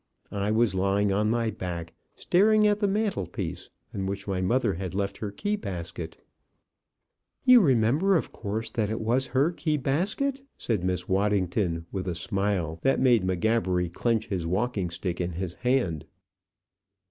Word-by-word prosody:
I 100 Hz, 0 st, -1 dB
was 110 Hz, -1 st, +2 dB
lying 100 Hz, +1 st, +1 dB
on 105 Hz, +2 st, +1 dB
my 115 Hz, -1 st, +1 dB
back, 85 Hz, -4 st, -5 dB, 0.2 s
staring 215 Hz, +4 st, +4 dB
at 210 Hz, 0 st, +3 dB
the 205 Hz, -, +2 dB
mantelpiece, 195 Hz, -, -2 dB, 0.2 s
on 95 Hz, -1 st, -3 dB
which 100 Hz, +1 st, -4 dB
my 95 Hz, -2 st, -1 dB
mother 115 Hz, +2 st, +1 dB
had 90 Hz, +1 st, -5 dB
left 100 Hz, 0 st, -2 dB
her 105 Hz, -, -3 dB
key 205 Hz, -, -2 dB
basket." 85 Hz, -, -6 dB, 1.3 s
"You 255 Hz, -2 st, +8 dB
remember, 140 Hz, -, +3 dB
of -, -, -4 dB
course, 110 Hz, +1 st, -4 dB
that 110 Hz, -3 st, -1 dB
it 110 Hz, -, -2 dB
was 125 Hz, +4 st, +1 dB
her 135 Hz, +6 st, +2 dB
key 155 Hz, -3 st, -1 dB
basket?" 200 Hz, -, 0 dB, 0.2 s
said 110 Hz, -7 st, -1 dB
Miss 90 Hz, -1 st, -1 dB
Waddington, 95 Hz, -3 st, 0 dB
with 95 Hz, -1 st, -4 dB
a 90 Hz, -, -2 dB
smile 90 Hz, -3 st, -1 dB
that 135 Hz, -, +2 dB
made 120 Hz, -6 st, +4 dB
M'Gabbery 95 Hz, -1 st, +1 dB
clench 115 Hz, 0 st, 0 dB
his 90 Hz, -4 st, -2 dB
walking 100 Hz, 0 st, -1 dB
stick 85 Hz, +1 st, -3 dB
in 90 Hz, 0 st, -2 dB
his 90 Hz, 0 st, -4 dB
hand. 105 Hz, -, 0 dB
105 Hz, 160 wpm, -27 LUFS, 90-130 Hz, 1.3 s, You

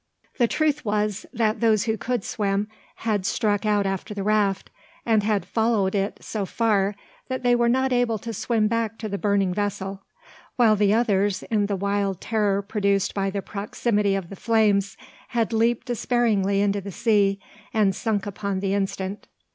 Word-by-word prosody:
The 240 Hz, -, +4 dB
truth 300 Hz, +2 st, 0 dB
was, 210 Hz, -1 st, -1 dB
that 225 Hz, -2 st, 0 dB
those 220 Hz, -3 st, +3 dB
who 220 Hz, -1 st, 0 dB
could 240 Hz, 0 st, -2 dB
swim 200 Hz, -1 st, -1 dB, 0.3 s
had 215 Hz, -4 st, -1 dB
struck 205 Hz, +1 st, 0 dB
out 205 Hz, -1 st, +2 dB
after 195 Hz, +2 st, -3 dB
the 200 Hz, -, -3 dB
raft, 205 Hz, -2 st, +1 dB, 0.3 s
and 220 Hz, -2 st, +3 dB
had 205 Hz, -3 st, 0 dB
followed 220 Hz, -2 st, +1 dB
it 200 Hz, 0 st, -2 dB
so 215 Hz, -2 st, -3 dB
far 205 Hz, -1 st, +1 dB, 0.3 s
that 260 Hz, -1 st, -4 dB
they 245 Hz, 0 st, +4 dB
were 240 Hz, -1 st, +3 dB
not 260 Hz, +1 st, +2 dB
able 245 Hz, -2 st, +1 dB
to 230 Hz, +2 st, -6 dB
swim 220 Hz, 0 st, +1 dB
back 225 Hz, 0 st, -1 dB
to 220 Hz, -, -5 dB
the 200 Hz, -1 st, -4 dB
burning 200 Hz, -3 st, +1 dB
vessel; 195 Hz, -1 st, -3 dB, 0.5 s
while 225 Hz, -3 st, +5 dB
the 205 Hz, -1 st, +3 dB
others, 205 Hz, -4 st, +1 dB
in 205 Hz, -2 st, +2 dB
the 200 Hz, -, -1 dB
wild 200 Hz, -1 st, -1 dB
terror 205 Hz, -3 st, 0 dB
produced 200 Hz, -1 st, 0 dB
by 195 Hz, -1 st, 0 dB
the 195 Hz, 0 st, -4 dB
proximity 205 Hz, 0 st, -1 dB
of 190 Hz, -3 st, -4 dB
the -, -, -6 dB
flames, 205 Hz, -2 st, +2 dB, 0.3 s
had 230 Hz, -1 st, -1 dB
leaped 230 Hz, +1 st, +1 dB
despairingly 220 Hz, -5 st, +1 dB
into 200 Hz, 0 st, +1 dB
the 200 Hz, +1 st, -7 dB
sea, 200 Hz, -2 st, +2 dB, 0.3 s
and 205 Hz, -4 st, +2 dB
sunk 210 Hz, -2 st, -1 dB
upon 200 Hz, -1 st, -3 dB
the 195 Hz, 0 st, -1 dB
instant. 195 Hz, 0 st, -3 dB
205 Hz, 175 wpm, -24 LUFS, 200-225 Hz, 0.5 s, while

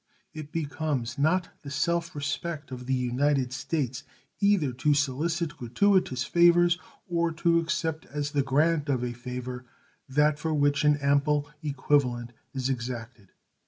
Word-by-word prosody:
It 155 Hz, -1 st, -8 dB
becomes 145 Hz, -5 st, -2 dB
not 170 Hz, +4 st, +2 dB
the 145 Hz, -, -8 dB
self 170 Hz, +4 st, -1 dB
respect 145 Hz, 0 st, -4 dB
of 125 Hz, -1 st, -7 dB
the 135 Hz, -, +1 dB
United 130 Hz, +1 st, +1 dB
States 130 Hz, -4 st, -2 dB, 0.4 s
either 200 Hz, -9 st, +3 dB
to 145 Hz, +4 st, +2 dB
solicit 150 Hz, +3 st, 0 dB
gratuitous 130 Hz, -, +2 dB
favors 175 Hz, 0 st, +4 dB, 0.3 s
or 170 Hz, -1 st, +1 dB
to 170 Hz, +1 st, +3 dB
accept 160 Hz, -1 st, -2 dB
as 145 Hz, 0 st, -3 dB
the 145 Hz, -2 st, +2 dB
grant 150 Hz, +3 st, +1 dB
of 130 Hz, -3 st, +1 dB
a 120 Hz, -1 st, -2 dB
favor 125 Hz, +1 st, -6 dB, 0.5 s
that 150 Hz, +2 st, +3 dB
for 160 Hz, 0 st, -1 dB
which 145 Hz, 0 st, +2 dB
an 150 Hz, -1 st, +4 dB
ample 145 Hz, +1 st, +2 dB
equivalent 135 Hz, -4 st, 0 dB, 0.2 s
is 130 Hz, -2 st, -2 dB
exacted. 120 Hz, -4 st, -5 dB
145 Hz, 140 wpm, -27 LUFS, 130-160 Hz, 0.5 s, favors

